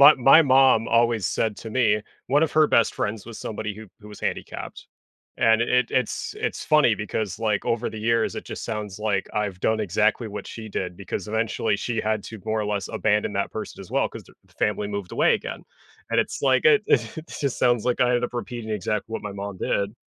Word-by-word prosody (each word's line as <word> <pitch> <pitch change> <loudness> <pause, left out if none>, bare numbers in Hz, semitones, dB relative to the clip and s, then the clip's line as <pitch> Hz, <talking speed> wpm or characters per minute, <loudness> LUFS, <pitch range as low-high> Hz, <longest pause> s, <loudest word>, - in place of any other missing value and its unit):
my 145 +2 +10
my 135 +5 +7
mom 130 -4 +5
always 115 -3 +2
said 110 +2 -1
to 115 - -8
me, 110 -3 +2 0.2
1 145 +4 +3
of 160 - +2
her 155 -1 +5
best 115 - +3
friends 105 -1 -3
was 115 -2 -8
somebody 105 -1 -4
who 110 0 -10
who 105 - -12
was 105 - -11
handicapped. - - -5 0.5
And 115 0 +4
i - - +2
i 125 - +3
it's 125 -3 -1
it's - - -3
funny 150 -7 +4
because, 105 -1 -3
like, 110 -3 0
over 115 +1 0
the 110 - -7
years, 115 +1 +1
it - - -6
just - - -7
sounds 105 -2 -4
like 105 -2 0
I've 100 -3 -2
done 110 0 +1
exactly 110 +3 +1
what 105 - -7
she 110 -1 -8
did 90 -3 -3
because 100 -1 -5
eventually 110 -1 0
she 115 +2 -2
had 110 -1 0
to, 110 - -8
more 110 0 0
or 105 - -2
less, 100 -2 -2
abandon 105 0 0
that - - -1
person - - -6
as - - -11
well, - - +1
'cause - - -10
the - - -20
f - - -27
family 105 0 0
moved 100 -3 -5
away - - +4
again. - - -5 0.5
And - - +3
it's - - -4
like 130 -2 +3
it 210 +7 +6
it 120 +7 0 0.2
just 140 -3 -1
sounds 120 -3 +2
like 125 -1 0
I 125 - +4
ended 125 0 +2
up 120 - -5
repeating 120 -2 -5
exactly 105 +2 -2
what - - -3
my 105 - -5
mom 100 -1 -6
did. 100 +1 -1
110 Hz, 225 wpm, -24 LUFS, 105-120 Hz, 0.5 s, my